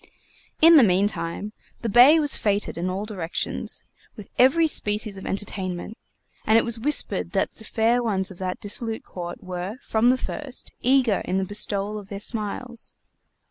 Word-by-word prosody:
In 330 Hz, 0 st, +9 dB
the 275 Hz, -, +7 dB
meantime, 200 Hz, 0 st, 0 dB, 0.3 s
the -, -, -1 dB
Bey 250 Hz, +9 st, +7 dB
was 295 Hz, -2 st, +3 dB
feted 205 Hz, -1 st, -1 dB
in 175 Hz, +2 st, -3 dB
all 195 Hz, +3 st, -3 dB
directions, 185 Hz, -6 st, -4 dB, 0.3 s
with 210 Hz, -4 st, -11 dB
every 275 Hz, +6 st, +5 dB
species 210 Hz, -7 st, +1 dB
of 190 Hz, -, -9 dB
entertainment, 195 Hz, 0 st, -4 dB, 0.5 s
and 220 Hz, -, +4 dB
it -, -, +2 dB
was 235 Hz, -1 st, -3 dB
whispered 295 Hz, +6 st, +1 dB
that -, -, 0 dB
the 220 Hz, -, -15 dB
fair 230 Hz, +2 st, +1 dB
ones 200 Hz, -4 st, -1 dB
of 180 Hz, -, -13 dB
that 185 Hz, -1 st, -4 dB
dissolute 220 Hz, +2 st, -4 dB
court 175 Hz, -1 st, -8 dB
were, 185 Hz, +4 st, -5 dB
from 225 Hz, +2 st, +2 dB
the 255 Hz, -, +3 dB
first, 270 Hz, 0 st, -6 dB
eager 255 Hz, -5 st, +2 dB
in 185 Hz, -, -1 dB
the 190 Hz, -, 0 dB
bestowal 205 Hz, +1 st, 0 dB
of 200 Hz, -1 st, -13 dB
their 200 Hz, -, -6 dB
smiles. 230 Hz, +3 st, -5 dB
210 Hz, 170 wpm, -24 LUFS, 190-240 Hz, 0.5 s, In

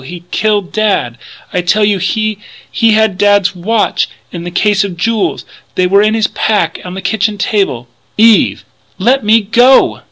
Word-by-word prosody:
he's 170 Hz, +6 st, -10 dB
killed 210 Hz, -4 st, -1 dB
Dad, 200 Hz, -, -1 dB, 0.4 s
I 180 Hz, -, 0 dB
tell 210 Hz, +4 st, +1 dB
you! 205 Hz, -2 st, +1 dB
He 215 Hz, +3 st, -1 dB, 0.4 s
had 220 Hz, -4 st, +2 dB
Dad's 205 Hz, -2 st, +2 dB
watch 210 Hz, +5 st, -1 dB, 0.2 s
and 170 Hz, -1 st, -6 dB
the -, -, -3 dB
case 200 Hz, +3 st, +1 dB
of 190 Hz, -4 st, -6 dB
jewels 220 Hz, +3 st, -1 dB, 0.3 s
they 185 Hz, -, +1 dB
were 200 Hz, +2 st, +3 dB
in 215 Hz, +1 st, +1 dB
his 220 Hz, -1 st, +1 dB
pack 205 Hz, -7 st, -1 dB
on 180 Hz, 0 st, -8 dB
the 190 Hz, -, -7 dB
kitchen 210 Hz, +1 st, -1 dB
table 190 Hz, -, -1 dB, 0.2 s
" -, -, -41 dB
"Eve!" 220 Hz, 0 st, +3 dB, 0.3 s
"Let 250 Hz, +7 st, +1 dB
me 220 Hz, +2 st, +4 dB
go! 240 Hz, +6 st, +3 dB
205 Hz, 170 wpm, -12 LUFS, 185-220 Hz, 0.4 s, me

